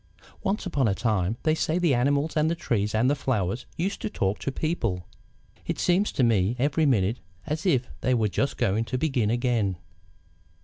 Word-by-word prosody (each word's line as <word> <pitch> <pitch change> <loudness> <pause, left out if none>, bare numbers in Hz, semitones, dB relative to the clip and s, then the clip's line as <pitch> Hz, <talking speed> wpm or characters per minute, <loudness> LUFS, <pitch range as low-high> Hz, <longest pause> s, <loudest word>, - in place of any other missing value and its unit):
"Once 200 +2 -1
upon 140 -9 +1
a 100 - +1
time, 105 -2 0
they 155 - +3
say, 160 +1 0
the 175 -5 +3
animals 140 +5 +1
and 155 0 +3
the 170 - 0
trees 105 -9 -1
and 115 +4 +3
the 140 - +4
flowers 120 -6 -1
used 190 +4 -2
to 105 - -2
talk 95 0 -1
to 135 - -2
people. 115 - -2 0.6
It - - -1
seems 185 +4 +2
to 135 - +1
me, 110 -2 +2
every 145 +4 +2
minute, 110 -2 +2 0.3
as 155 +5 -2
if 130 -7 +2
they 130 - +2
were 110 -2 +2
just 140 +7 -1
going 110 -2 +1
to 125 - -2
begin 130 -7 +1
again. 115 -6 0
125 Hz, 190 wpm, -26 LUFS, 110-155 Hz, 0.6 s, the